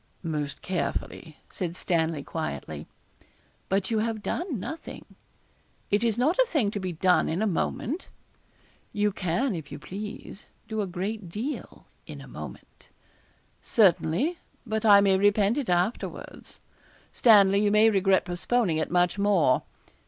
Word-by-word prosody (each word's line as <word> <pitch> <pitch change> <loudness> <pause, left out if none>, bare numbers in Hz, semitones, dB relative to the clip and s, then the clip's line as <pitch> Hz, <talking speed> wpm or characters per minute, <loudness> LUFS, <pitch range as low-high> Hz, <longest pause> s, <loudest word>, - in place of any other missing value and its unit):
'Most 150 -4 -4
carefully,' 170 -3 -4
said 175 -2 -4
Stanley, 160 -5 -1
quietly. 155 - -5 0.8
'But 195 +2 0
you 220 - +2
have 220 -1 -2
done 325 - -3
nothing.' 320 - -7 0.9
'It 205 +2 +2
is 230 -2 +1
not 300 - +1
a - - +6
thing 265 - +1
to 205 - -4
be 185 -1 -3
done 180 0 +2
in 165 - -1
a 220 - +1
moment.' 230 - -2 0.9
'You 210 0 +1
can, 200 +7 -1
if 160 -5 -7
you - - -6
please, 205 +4 -8 0.2
do 220 -2 -2
a 200 - -2
great 190 +2 -4
deal 230 - -6 0.2
in - - -8
a - - -11
moment' - - -11 0.7
'Certainly; 220 - +2 0.3
but 220 -1 -2
I 200 -1 +8
may 195 -1 +4
repent 205 +4 +3
it 265 - -4
afterwards.' 180 +6 -3 0.5
'Stanley, 200 -4 +5
you 210 - +3
may 215 +2 +5
regret 195 -2 +3
postponing 180 0 0
it, 155 - -1
much 180 +2 +1
more.' 170 -10 +3
200 Hz, 145 wpm, -27 LUFS, 175-220 Hz, 0.9 s, I